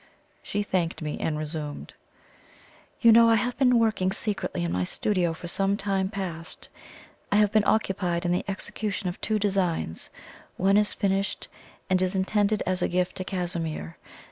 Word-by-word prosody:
She 205 0 -2
thanked 175 -5 -1
me 150 - -4
and 155 -1 -1
resumed: 150 -1 -5 1.1
"You 230 - +7
know 230 +1 +7
I 225 - +6
have 245 +3 0
been 250 -3 +5
working 220 -5 +2
secretly 195 - -2
in 85 - -1
my 90 +1 0
studio 180 - 0
for 165 +2 -7
some 195 +3 +1
time 195 -2 0
past. 180 -5 -5 0.6
I - - +3
have 210 -1 +4
been 215 -2 +3
occupied 185 -5 +1
in 175 - +1
the 180 - +1
execution 195 0 -1
of 175 - -8
two 215 0 +1
designs 190 - -1 0.5
one 195 +2 +4
is 210 0 +2
finished, 195 0 -1 0.4
and 185 -1 +2
is 185 +1 0
intended 205 +2 +1
as 185 -1 -1
a - - +2
gift 180 0 -1
to 185 - -3
Casimir. 170 - -3
190 Hz, 170 wpm, -26 LUFS, 175-205 Hz, 1.1 s, You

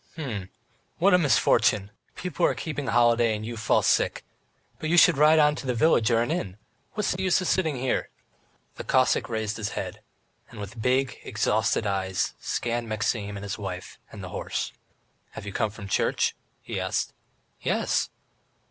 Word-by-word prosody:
"H'm. 110 - -4 0.5
What 195 +3 +4
a 180 - +6
misfortune! 105 - +3 0.2
People 180 -1 -4
are - - 0
keeping 145 -4 -4
holiday, 120 -1 +3
and 105 0 -5
you 120 +1 -5
fall 115 - +2
sick! - - +1 0.5
But 155 - -3
you 175 - +3
should 175 -1 +7
ride 150 +3 +6
on 150 -1 +5
to 130 - -5
a 125 - +1
village 115 -3 +4
or 115 -1 +3
an 120 - -2
inn, 100 - -3 0.4
what's 210 -2 0
the 185 - -2
use 185 -2 +3
of 185 - -2
sitting 160 -6 +1
here!" 130 0 -1 0.7
The - - -5
Cossack 130 -1 +2
raised 110 -1 -2
his 110 -2 -3
head, - - -5 0.5
and 115 - -11
with 105 +3 -7
big, 130 +1 +1
exhausted 110 -1 +1
eyes, 95 -2 -1
scanned 120 -1 -2
Maxim, 105 -1 -1
his 100 +1 -5
wife, 95 -2 -6
and - - -9
the - - -6
horse. - - -3 0.6
"Have - - -8
you 100 - -6
come 110 -2 0
from 105 -1 -9
church?" - - +1 0.3
he - - -4
asked. - - -1 0.5
"Yes." - - 0
120 Hz, 175 wpm, -26 LUFS, 105-150 Hz, 0.7 s, should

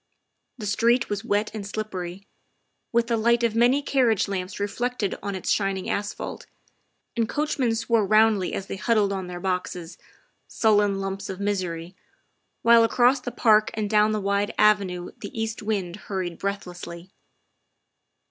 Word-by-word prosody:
The 215 - -6
street 230 +4 +2
was 205 +1 -2
wet 210 -1 0
and 215 -2 -5
slippery, 195 -3 -5 0.7
with 235 0 +2
the 230 -1 0
light 235 +2 +2
of 230 -2 +1
many 245 +5 +4
carriage 250 -7 +2
lamps 190 0 -4
reflected 205 +1 -2
on 200 -1 -3
its 185 - -2
shining 195 -2 0
asphalt, 205 0 -4 0.7
and 230 -1 0
coachmen 285 -6 0
swore 230 -1 +1
roundly 215 -3 +3
as 195 - -4
they 195 - -6
huddled 210 -2 +2
on 190 -2 -4
their 175 0 -6
boxes, 180 -2 -3 0.5
sullen 205 -3 +2
lumps 195 0 -4
of 190 -1 -5
misery, 180 -4 -3 0.7
while 230 0 +7
across 245 +3 +4
the 245 - -4
park 215 -3 +4
and 215 -1 -2
down 210 0 +4
the 215 - 0
wide 200 +1 0
avenue 195 -4 +2
the 230 - -7
east 225 0 -3
wind 200 -5 -2
hurried 185 -5 -4
breathlessly. 180 -3 -5
205 Hz, 150 wpm, -25 LUFS, 190-225 Hz, 0.7 s, while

